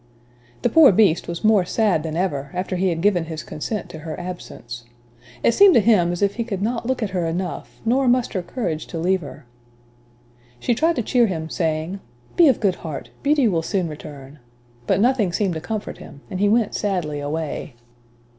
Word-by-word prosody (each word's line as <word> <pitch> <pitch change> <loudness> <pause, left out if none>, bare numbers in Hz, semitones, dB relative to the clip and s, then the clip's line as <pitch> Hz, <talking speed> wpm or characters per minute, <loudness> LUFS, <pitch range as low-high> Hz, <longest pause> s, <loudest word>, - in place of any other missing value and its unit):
The - - +3
poor 320 -6 +7
Beast 190 -4 +3
was 170 0 -5
more 215 -3 +5
sad 190 -3 +1
than 160 0 -4
ever, 145 -7 -1
after 185 +1 -2
he 185 +1 +1
had 165 -1 -2
given 185 -5 +3
his 160 -1 -6
consent 210 +7 -4
to 160 - -9
her 155 0 -6
absence. 145 -9 -8 0.6
It - - +5
seemed 395 - +7
to - - +7
him 200 -6 +3
as 175 +3 -2
if 200 +2 +1
he 235 - 0
could 200 -4 -4
not 230 +1 -2
look 260 -2 -1
at 205 - -3
her 180 -3 -1
enough, 175 +2 -4
nor 255 +3 +2
muster 240 -6 +1
courage 175 -5 -4
to 170 - -6
leave 180 +3 +1
her. 145 -1 -10 1.1
She 240 - +1
tried 325 +8 +2
to 240 - -1
cheer 240 +1 +3
him, 160 -4 -4
saying, 160 +3 -2 0.4
"Be 340 - +6
of 265 - +3
good 195 -5 +1
heart, 155 -4 -7
Beauty 285 -3 +3
will 170 -6 +1
soon 185 +1 -1
return," 145 -2 -10 0.5
but - - +2
nothing 230 -4 +2
seemed 190 0 0
to 160 - -5
comfort 215 +3 -5
him, 140 - -12
and 185 - -3
he 205 +1 +3
went 225 -1 +2
sadly 175 -8 -2
away. 145 -2 -4
185 Hz, 200 wpm, -22 LUFS, 160-225 Hz, 1.1 s, poor